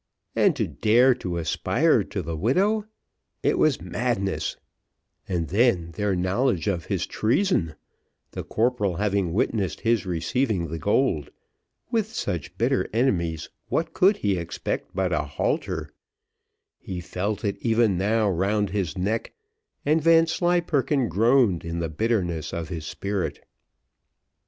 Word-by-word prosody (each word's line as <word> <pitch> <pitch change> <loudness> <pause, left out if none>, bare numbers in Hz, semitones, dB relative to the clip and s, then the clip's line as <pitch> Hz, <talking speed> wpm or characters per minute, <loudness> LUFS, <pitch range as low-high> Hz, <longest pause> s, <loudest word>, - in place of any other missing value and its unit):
and - - +4
to - - -1
dare 120 +4 +4
to 90 -7 -4
aspire 80 -2 +2
to - - -5
the 80 +1 -4
widow 190 - +1 0.6
it - - +2
was 155 -4 +3
madness 100 0 -2 0.7
and 85 -4 -1
then 95 -5 +2
their 100 +3 -1
knowledge 95 +2 0
of 90 -5 -1
his - - -1
treason 110 - +1 0.6
the - - -5
corporal 110 -5 0
having 100 -2 0
witnessed 100 -1 -1
his 115 -2 +2
receiving 90 - -1
the 80 +1 -4
gold 100 - +1 0.6
with 220 -2 0
such 90 - -4
bitter - - +1
enemies 85 -9 0 0.2
what 165 0 -1
could 195 +3 +4
he 100 -3 0
expect 85 - -4
but - - 0
a - - +2
halter - - -2 0.9
he 90 -2 -6
felt 100 +5 -3
it 100 - 0
even 115 -3 +2
now 105 +4 +1
round 100 +2 0
his 95 -6 -2
neck, 105 +5 -2 0.5
and 155 +2 +3
Vanslyperken 165 - +2
groaned 110 -2 +3
in 85 0 -4
the 85 -1 -2
bitterness 85 -3 -1
of 85 -1 -4
his 80 -3 -5
spirit. 100 -1 -3
100 Hz, 130 wpm, -25 LUFS, 85-125 Hz, 0.9 s, and